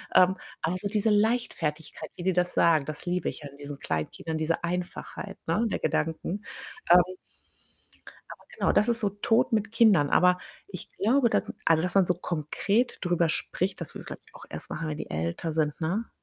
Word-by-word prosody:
Ähm, 185 Hz, +1 st, +6 dB, 0.2 s
aber 170 Hz, +3 st, 0 dB
so 200 Hz, +2 st, -3 dB
diese 215 Hz, +1 st, +1 dB
Leichtfertigkeit, 205 Hz, -8 st, 0 dB
wie 175 Hz, -, -7 dB
die 190 Hz, 0 st, +2 dB
das 180 Hz, 0 st, +1 dB
sagen, 160 Hz, -4 st, +4 dB
das 155 Hz, +2 st, -6 dB
liebe 180 Hz, +1 st, 0 dB
ich -, -, -7 dB
ja 145 Hz, -2 st, -8 dB
in 140 Hz, -, -16 dB
diesen 145 Hz, 0 st, -8 dB
Kleinkindern, 120 Hz, -, -3 dB
diese 160 Hz, +2 st, -1 dB
Einfachheit, 180 Hz, +3 st, -5 dB
ne, 200 Hz, +8 st, +2 dB
der -, -, -2 dB
Gedanken. 165 Hz, +5 st, -1 dB, 0.5 s
Ähm 180 Hz, 0 st, +9 dB, 1.3 s
aber, -, -, -11 dB
genau, -, -, +3 dB
das 215 Hz, -, +3 dB
ist 230 Hz, -, +1 dB
so 205 Hz, -, +2 dB
Tod 205 Hz, +4 st, +1 dB
mit 210 Hz, -1 st, 0 dB
Kindern, 205 Hz, -11 st, +5 dB
aber 180 Hz, 0 st, +5 dB, 0.3 s
ich 190 Hz, -2 st, -8 dB
glaube, 235 Hz, +4 st, +3 dB
da -, -, +3 dB, 0.2 s
also, 160 Hz, -1 st, +4 dB
dass 180 Hz, +1 st, -2 dB
man 195 Hz, -3 st, +5 dB
so -, -, +3 dB
konkret 180 Hz, +8 st, -1 dB
drüber 175 Hz, -2 st, +2 dB
spricht, 185 Hz, +3 st, -2 dB
das 170 Hz, -, -6 dB
würde -, -, -7 dB
ich, -, -, -19 dB
glaube -, -, -8 dB
ich, -, -, -23 dB
auch -, -, -11 dB
erst -, -, -7 dB
machen, 160 Hz, +1 st, -3 dB
wenn 150 Hz, -, -3 dB
die -, -, -5 dB
älter 85 Hz, -, -2 dB
sind, 150 Hz, -1 st, 0 dB
ne? 190 Hz, +8 st, -1 dB
180 Hz, 200 wpm, -27 LUFS, 160-205 Hz, 1.3 s, Ähm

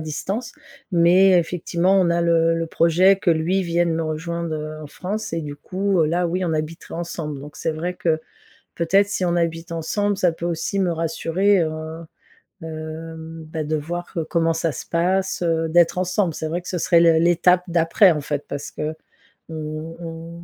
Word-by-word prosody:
distance 190 Hz, +9 st, -4 dB, 0.4 s
mais 180 Hz, +3 st, +5 dB
effectivement 175 Hz, +2 st, 0 dB
on 180 Hz, -, +3 dB
a 170 Hz, -, +2 dB
le 165 Hz, -1 st, +3 dB
le 165 Hz, 0 st, -1 dB
projet 175 Hz, +4 st, +4 dB
que 180 Hz, -, +1 dB
lui 170 Hz, +4 st, +1 dB
vienne 170 Hz, 0 st, +1 dB
me 165 Hz, -, -1 dB
rejoindre 165 Hz, +1 st, -3 dB, 0.3 s
en 150 Hz, -, -7 dB
France 205 Hz, +7 st, -5 dB
et 165 Hz, -, -1 dB
du 145 Hz, -1 st, -6 dB
coup, 190 Hz, +3 st, -1 dB
heu, 155 Hz, -, +2 dB
là 175 Hz, +3 st, +1 dB
oui 180 Hz, +2 st, -1 dB
on 160 Hz, -, 0 dB
habiterait 155 Hz, +1 st, -5 dB
ensemble. 165 Hz, -4 st, -5 dB
Donc 145 Hz, +1 st, -11 dB
c'est 160 Hz, -, -1 dB
vrai 170 Hz, +3 st, -3 dB
que 160 Hz, -3 st, 0 dB, 0.6 s
peut-être 195 Hz, +4 st, +3 dB
si 190 Hz, -2 st, -1 dB
on 175 Hz, 0 st, +1 dB
habite 165 Hz, 0 st, -1 dB
ensemble 205 Hz, +5 st, -1 dB
ça 180 Hz, -3 st, +3 dB
peut 165 Hz, +1 st, -6 dB
aussi 170 Hz, +3 st, -2 dB
me 180 Hz, -2 st, +2 dB
rassurer, 165 Hz, +4 st, +1 dB
heu, 160 Hz, +1 st, -4 dB, 0.6 s
hem, 160 Hz, 0 st, -7 dB
bah, 160 Hz, -1 st, -3 dB
de 155 Hz, -, -1 dB
voir 175 Hz, +5 st, -6 dB
comment 165 Hz, -1 st, +2 dB
ça 165 Hz, 0 st, -1 dB
se -, -, -7 dB
passe, 180 Hz, +2 st, 0 dB, 0.3 s
d'être 170 Hz, +1 st, +4 dB
ensemble, 185 Hz, -1 st, 0 dB
c'est 155 Hz, -, -4 dB
vrai 175 Hz, +3 st, -2 dB
que -, -, -9 dB
ce 180 Hz, -, -2 dB
serait 170 Hz, 0 st, +4 dB
le 165 Hz, -1 st, +5 dB
l'étape 175 Hz, +1 st, +4 dB
d'après, 170 Hz, +3 st, +4 dB
en 150 Hz, -2 st, -1 dB
fait. 145 Hz, 0 st, -3 dB
Parce 145 Hz, 0 st, -5 dB
que 155 Hz, +1 st, -3 dB, 0.6 s
on 160 Hz, -1 st, -5 dB, 0.4 s
on 165 Hz, +1 st, -8 dB
170 Hz, 185 wpm, -22 LUFS, 160-180 Hz, 0.6 s, mais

